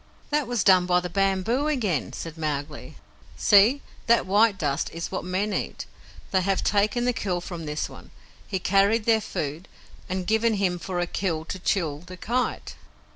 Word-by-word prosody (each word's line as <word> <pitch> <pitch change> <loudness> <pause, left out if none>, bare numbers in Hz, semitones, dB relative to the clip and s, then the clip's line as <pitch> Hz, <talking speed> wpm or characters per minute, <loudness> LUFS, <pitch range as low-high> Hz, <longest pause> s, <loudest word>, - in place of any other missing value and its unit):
"That 295 -3 +1
was 240 -3 0
done 185 -2 +5
by 180 0 +4
the 180 -1 -6
bamboo 195 - +1
again," 215 - 0
said 165 -2 -7
Mowgli. 150 -3 -4 0.4
"See! 215 - +5 0.2
that 235 0 +4
white 205 +2 +3
dust 145 -3 -1
is 165 0 -5
what 185 - -3
men 190 +3 -1
eat. - - -3 0.5
They 190 - +3
have 195 +1 0
taken 210 +4 +1
the 250 - +2
kill 185 -6 -2
from 175 -2 -7
this 150 +1 -2
one, - - -13 0.4
he 195 - -2
carried 200 +4 +2
their 225 -1 +4
food, 155 -3 -4 0.4
and 185 0 -2
given 220 +2 +2
him 185 -3 0
for 180 0 -4
a 175 - +1
kill 170 -3 -2
to 185 - -6
Chil, 165 -6 0
the 180 +2 -11
Kite." 245 +7 -2
190 Hz, 180 wpm, -25 LUFS, 175-215 Hz, 0.5 s, done